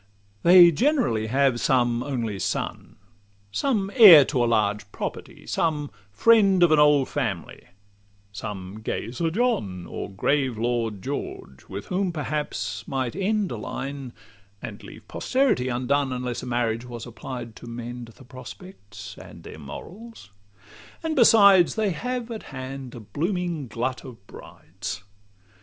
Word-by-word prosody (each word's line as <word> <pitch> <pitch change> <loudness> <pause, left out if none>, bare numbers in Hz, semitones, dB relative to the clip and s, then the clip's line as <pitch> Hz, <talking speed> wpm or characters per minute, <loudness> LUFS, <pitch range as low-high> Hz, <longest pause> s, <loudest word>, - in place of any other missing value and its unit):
They 175 0 +8
generally 230 - +1
have 130 0 +2
some 120 -2 +2
only 120 -7 -3
son, 95 0 -4 0.6
Some 205 - 0
heir 185 - +10
to 130 -5 0
a 120 - +1
large 105 -2 0
property, - - -7
some 150 -3 -1 0.2
friend 195 - +4
Of 170 - +5
an 155 - +5
old 150 -2 +5
family, 105 - -4 0.7
some 100 -1 -7
gay 110 +1 -4
Sir 165 +7 -1
john, 160 - -1
Or - - -6
grave 130 +5 0
Lord 115 -3 -2
George, 130 - -6
with 100 +1 -6
whom 185 0 0
perhaps 145 -9 -4
might 130 -3 -2
end 200 0 0
A 120 - -4
line, 135 +3 -6 0.5
and - - -8
leave - - -13
posterity 255 - 0
undone, 130 +3 0
Unless 125 -1 -3
a 125 - -8
marriage 120 -1 -1
was 120 -2 -8
applied 120 0 -8
to - - -11
mend 120 +1 -7
The 115 +3 -16
prospect 130 - -11
and - - -13
their - - -10
morals: 175 - -10 0.7
and 320 -1 -1
besides, 200 - +6
They 215 -3 +1
have 245 +7 -4
at 220 - -5
hand 130 -1 -7
a - - -7
blooming 170 - -3
glut 125 +3 -3
of 115 -8 -12
brides. 105 - -9
130 Hz, 140 wpm, -24 LUFS, 115-175 Hz, 0.7 s, heir